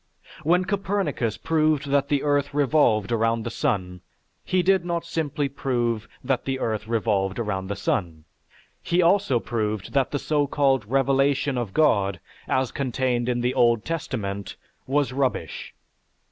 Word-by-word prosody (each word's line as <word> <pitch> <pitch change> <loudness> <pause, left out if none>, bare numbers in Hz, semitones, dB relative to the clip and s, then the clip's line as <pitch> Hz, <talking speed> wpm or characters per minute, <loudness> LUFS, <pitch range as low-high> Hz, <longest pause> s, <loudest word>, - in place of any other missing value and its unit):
When 180 +4 +2
Copernicus 195 - -1
proved 155 -3 +1
that 140 0 +2
the 145 -1 0
earth 145 -1 0
revolved 135 -8 +3
around 115 0 +1
the 115 - -4
sun, 90 -5 -2 0.4
he 185 -1 +1
did 190 0 +3
not 170 -1 -2
simply 150 -3 -1
prove 120 -5 -1 0.2
that 130 0 0
the 135 -1 -2
earth 110 -2 -2
revolved 105 -4 0
around 100 -5 -2
the 100 - -3
sun, 85 -5 -2 0.6
he 175 +1 +2
also 175 -8 +3
proved 110 -4 -3
that 135 -2 +2
the 145 - -1
so 145 0 0
called 135 -5 +2
revelation 135 +2 +2
of 120 -5 -2
God, 100 -11 +2 0.3
as 130 -1 0
contained 125 -2 -1
in 120 -1 0
the 125 +1 0
Old 120 -3 +3
Testament, 100 - -4 0.3
was 135 -2 +1
rubbish. 135 -1 -2
130 Hz, 145 wpm, -24 LUFS, 110-145 Hz, 0.6 s, revolved